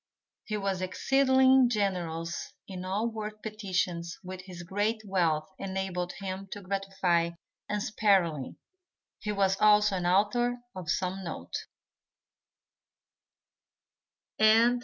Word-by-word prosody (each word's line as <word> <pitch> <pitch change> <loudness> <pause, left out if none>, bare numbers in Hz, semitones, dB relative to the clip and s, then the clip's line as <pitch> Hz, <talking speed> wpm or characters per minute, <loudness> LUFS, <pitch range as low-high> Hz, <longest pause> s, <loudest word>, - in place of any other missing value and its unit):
He 215 - -2
was 195 -2 -1
exceedingly 260 +6 +4
generous 175 -7 -2
in 185 -2 -6
all 200 +5 0
worthy 215 -2 -5
petitions 185 -5 -2
which 185 0 -7
his 180 -2 -8
great 210 +5 -1
wealth 165 -6 +1
enabled 190 -2 -3
him 195 0 -5
to 205 - -8
gratify 195 -3 0 0.4
unsparingly. 195 -8 +1 0.6
He 210 - -3
was 195 -1 +1
also 210 -2 +5
an 175 -1 -1
author 215 +6 +2 0.2
of 180 -4 -6
some 185 +4 -1
note. 155 - -7
195 Hz, 100 wpm, -29 LUFS, 180-210 Hz, 0.6 s, also